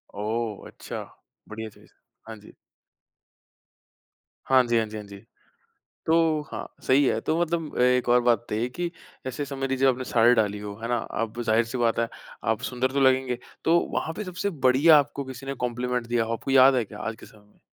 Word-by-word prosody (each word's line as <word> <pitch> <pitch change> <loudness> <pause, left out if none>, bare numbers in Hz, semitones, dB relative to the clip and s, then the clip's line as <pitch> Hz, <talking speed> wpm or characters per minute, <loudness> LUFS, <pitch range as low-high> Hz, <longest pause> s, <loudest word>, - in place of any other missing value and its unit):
ओह 110 +1 -3
अच्छा! - - -7 0.5
बढ़िया 110 +1 -6
चीज़, - - -21 0.4
हाँ 110 - -7
जी। 105 - -15 1.9
हाँ 130 -1 +5
जी, 120 -1 +2
हाँ 115 - +2
जी, 110 - -7
हाँ 105 - -7
जी। 100 0 -11 0.9
तो 160 -1 +3
हाँ, - - -5 0.2
सही 135 +2 +5
है। 110 - +1
तो 160 +2 0
मतलब 165 -2 -2
एक 125 -1 +3
और 120 0 +5
बात 120 -1 +4
है - - -26
बताइए 110 +3 -1
कि 175 +6 -4 0.4
ऐसे 130 +3 -3
समझ 135 -1 -4
लीजिए 135 0 +2
आपने 130 0 +1
साड़ी 120 0 +4
डाली 105 -3 +1
हो, 105 -1 -7
है 115 - -3
ना? 120 - +1
अब 115 0 -4
जाहिर-सी 115 +2 +1
बात 115 -1 +1
है, 115 - +1 0.4
आप 110 +2 0
सुंदर 130 +1 -1
तो 140 - 0
लगेंगे। 130 -2 +2 0.2
तो 170 +1 +4
वहाँ 160 - -2
पे 215 - -3
सबसे 185 +1 -3 0.2
बढ़िया 150 +5 +6
आपको 140 0 -3
किसी 130 0 -9
ने 135 - -3
कॉम्प्लीमेंट 125 0 -2
दिया 120 -1 +1
हो, 115 +1 -3
आपको 125 +4 -4
याद 135 0 +7
है 120 -3 +1
क्या 105 +1 -11
आज 115 +1 -4
के - - -12
समय 105 -1 -19
में? - - -31
125 Hz, 205 wpm, -25 LUFS, 115-135 Hz, 1.9 s, याद